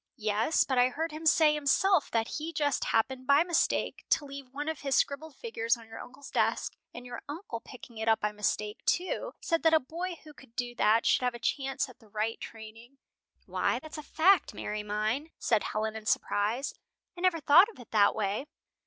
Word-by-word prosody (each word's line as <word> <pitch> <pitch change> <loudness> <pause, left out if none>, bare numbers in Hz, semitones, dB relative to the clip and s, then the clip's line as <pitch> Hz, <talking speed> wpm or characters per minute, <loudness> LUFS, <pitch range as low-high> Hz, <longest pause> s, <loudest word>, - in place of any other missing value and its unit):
"Yes, 215 +6 +2
but 260 -2 0
I 250 +1 +5
heard 320 +5 -3
him 315 +1 -3
say 310 -1 +5
himself 300 +4 +2
that 225 0 0
he 320 +2 -4
just 290 -3 0
happened, 255 +3 0
by 285 +3 +6
mistake, 345 -2 0
to 315 -3 +2
leave 275 -2 -9
one 290 +3 -5
of 320 -2 -2
his 275 -1 0
scribbled 290 +2 0
figures 230 - -1
on 230 - -13
your 225 - -9
uncle's 255 +3 -11
desk, - - 0 0.2
and 245 - -10
your 245 - -7
uncle, 295 - -5
picking 235 -2 -12
it 220 - -3
up 220 -1 +4
by 210 -1 -1
mistake, 210 +1 -2
too, 360 +1 0
said 330 0 0
that 320 -1 +5
a - - +6
boy 340 +7 -5
who 305 -1 -13
could 265 -5 -18
do 245 -1 -3
that 225 -1 +3
should - - +4
have 250 -1 0
a - - -8
chance 270 +2 -1
at 255 - -15
the 220 - -20
right 215 +2 -2
training." 225 +4 -11 0.5
"Why, - - 0
that's 310 0 -8
a - - -5
fact, 360 +6 +3
Mary 210 0 -3
mine," 215 +8 -2
said 220 -3 +1
Helen, 220 0 -2
in 220 -1 -7
surprise. 220 +8 0 0.4
"I 350 - -9
never 365 -3 +3
thought 315 +8 +7
of 460 - -14
it - - -11
in - - -26
that 205 -2 +4
way. 210 +6 -2
260 Hz, 215 wpm, -30 LUFS, 225-310 Hz, 0.5 s, thought